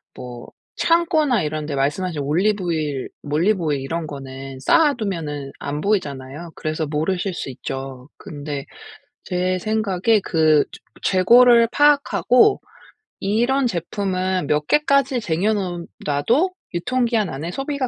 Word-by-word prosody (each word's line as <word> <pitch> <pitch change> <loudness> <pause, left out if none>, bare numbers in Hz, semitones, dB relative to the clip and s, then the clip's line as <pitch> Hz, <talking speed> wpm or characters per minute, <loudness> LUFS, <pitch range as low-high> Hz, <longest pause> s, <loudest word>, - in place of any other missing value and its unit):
뭐 125 -1 -9 0.3
창고나 320 - +2
이런 155 0 -3
데 150 -1 -4
말씀하신 145 +4 -1
올리브 185 +8 +1
오일 155 -5 -2
올리브 170 +7 +1
오일 145 -3 0
이런 165 +5 -3
거는 135 -1 -8
쌓아 310 - +4
두면은 155 - -4
안 145 +1 -4
보이잖아요. 150 -5 -2
그래서 155 +1 -3
모르실 175 +6 -1
수 165 - -5
있죠. 135 0 -7
근데 145 -2 -6 0.6
제 185 0 -1
생각에 215 0 +1
그 155 -3 +3 0.4
저 - - +1
재고를 235 +5 +6
파악하고 290 - +4 0.6
이런 240 +7 +1
제품은 185 -2 -2
몇 150 +1 0
개까지 275 -4 +2
쟁여 195 +3 0
놓은 180 -4 -3 0.2
놔도 235 - +2 0.2
유통 250 +9 0
기한 225 -4 0
안에 150 +6 -5
소비가 275 +2 -2
180 Hz, 280 characters per minute, -21 LUFS, 150-225 Hz, 0.6 s, 재고를